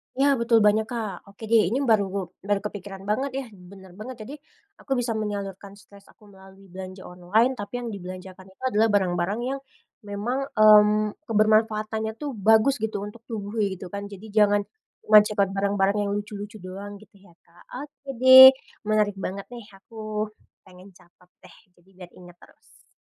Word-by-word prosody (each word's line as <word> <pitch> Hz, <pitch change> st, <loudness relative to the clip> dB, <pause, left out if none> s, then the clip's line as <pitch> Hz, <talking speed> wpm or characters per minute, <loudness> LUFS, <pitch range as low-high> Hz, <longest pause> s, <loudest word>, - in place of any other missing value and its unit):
Ya 280 Hz, +1 st, +3 dB
betul 230 Hz, -2 st, +3 dB
banyak, 215 Hz, +1 st, +3 dB
Kak. 215 Hz, -6 st, -6 dB
Oke 200 Hz, +3 st, -15 dB
deh, 220 Hz, -6 st, +5 dB
ini 260 Hz, +7 st, -1 dB
baru 220 Hz, -5 st, +3 dB, 0.3 s
baru 200 Hz, +1 st, -1 dB
kepikiran 195 Hz, -2 st, -8 dB
banget 265 Hz, +6 st, -1 dB
ya, 265 Hz, -, -6 dB
bener 190 Hz, 0 st, -15 dB
banget. 255 Hz, +4 st, -7 dB
Jadi, 270 Hz, -, -9 dB, 0.5 s
aku 270 Hz, -2 st, -3 dB
bisa 245 Hz, -1 st, -1 dB
menyalurkan 200 Hz, -1 st, -6 dB
stres 200 Hz, 0 st, -19 dB
aku -, -, -23 dB
melalui 190 Hz, -1 st, -18 dB
belanja 185 Hz, 0 st, -9 dB
online 185 Hz, +8 st, 0 dB
tapi 245 Hz, +4 st, -5 dB
yang 230 Hz, -, -5 dB
dibelanjakan 185 Hz, 0 st, -9 dB
itu 190 Hz, +6 st, -20 dB
adalah 225 Hz, -3 st, +2 dB
barang-barang 185 Hz, +2 st, 0 dB
yang 270 Hz, +2 st, -3 dB, 0.5 s
memang, 245 Hz, +7 st, -3 dB
mmm, 210 Hz, 0 st, +5 dB
kebermanfaatannya 220 Hz, 0 st, +1 dB
tuh 290 Hz, +2 st, -5 dB
bagus 220 Hz, +4 st, +3 dB
gitu 215 Hz, -2 st, -3 dB
untuk 220 Hz, +3 st, -11 dB
tubuh 220 Hz, -1 st, -5 dB
kayak 200 Hz, -2 st, 0 dB
gitu 180 Hz, -1 st, -10 dB
kan. 200 Hz, 0 st, -6 dB
Jadi 200 Hz, +1 st, -11 dB
jangan 205 Hz, -1 st, +3 dB, 0.5 s
nge-check 210 Hz, 0 st, +6 dB
out 195 Hz, -2 st, +1 dB
barang-barang 200 Hz, 0 st, 0 dB
yang -, -, -2 dB
lucu-lucu 205 Hz, 0 st, -7 dB
doang 200 Hz, +2 st, -8 dB
gitu 200 Hz, 0 st, -18 dB
ya, 175 Hz, -4 st, -21 dB
Kak. 170 Hz, +1 st, -22 dB, 0.2 s
Oke 290 Hz, -1 st, -15 dB
deh. 260 Hz, +1 st, +10 dB, 0.3 s
Menarik 210 Hz, -2 st, +1 dB
banget 195 Hz, +1 st, -5 dB
nih, 235 Hz, -4 st, -10 dB
aku 215 Hz, +1 st, -6 dB, 0.3 s
pengen 185 Hz, 0 st, -17 dB
catat 175 Hz, +1 st, -24 dB, 0.2 s
deh 180 Hz, -, -16 dB, 0.2 s
jadi 175 Hz, +2 st, -28 dB
biar 180 Hz, -2 st, -13 dB
inget 175 Hz, -1 st, -15 dB
terus. -, -, -23 dB
205 Hz, 170 wpm, -24 LUFS, 195-220 Hz, 0.5 s, deh